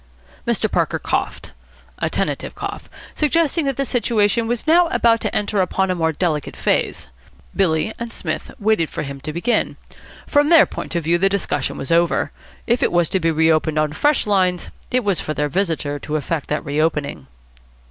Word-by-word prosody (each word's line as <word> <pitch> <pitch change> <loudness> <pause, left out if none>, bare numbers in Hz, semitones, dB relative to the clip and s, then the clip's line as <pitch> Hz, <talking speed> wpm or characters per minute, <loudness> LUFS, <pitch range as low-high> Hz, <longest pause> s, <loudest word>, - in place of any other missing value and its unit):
Mr. - - +1
Parker - - 0
coughed. - - -3 0.5
A - - 0
tentative - - -2
cough, - - -6 0.2
suggesting 320 +1 +1
that 275 -2 -1
the 275 - 0
situation 230 -2 +1
was 240 0 -2
now 340 +2 +5
about 230 -7 +3
to - - -2
enter 205 -1 +1
upon 190 +1 0
a - - +2
more 165 -2 +1
delicate 155 -2 -2
phase. - - -1 0.5
Billy 170 +1 +1
and 235 0 -5
Psmith - - -4
waited 215 - +1
for - - -4
him 140 -1 -7
to 155 - -4
begin. 175 +10 0 0.5
From 290 +1 +3
their 330 -3 +8
point - - -7
of 170 - 0
view 170 +2 +2
the 195 +2 +3
discussion 185 -8 -1
was 135 - -5
over. 170 +1 +2 0.3
If 235 +1 +1
it - - +2
was 175 -2 +2
to 190 - +1
be 165 -1 +1
reopened 160 -1 +2
on 155 -1 +1
fresh 290 - +2
lines, 185 -4 +1 0.2
it 255 0 +1
was 200 -4 +1
for 155 - -4
their 150 0 0
visitor 160 -5 -1
to 150 - -4
effect 155 +1 -2
that 150 +1 -2
reopening. 145 - -1
180 Hz, 185 wpm, -20 LUFS, 155-230 Hz, 0.5 s, their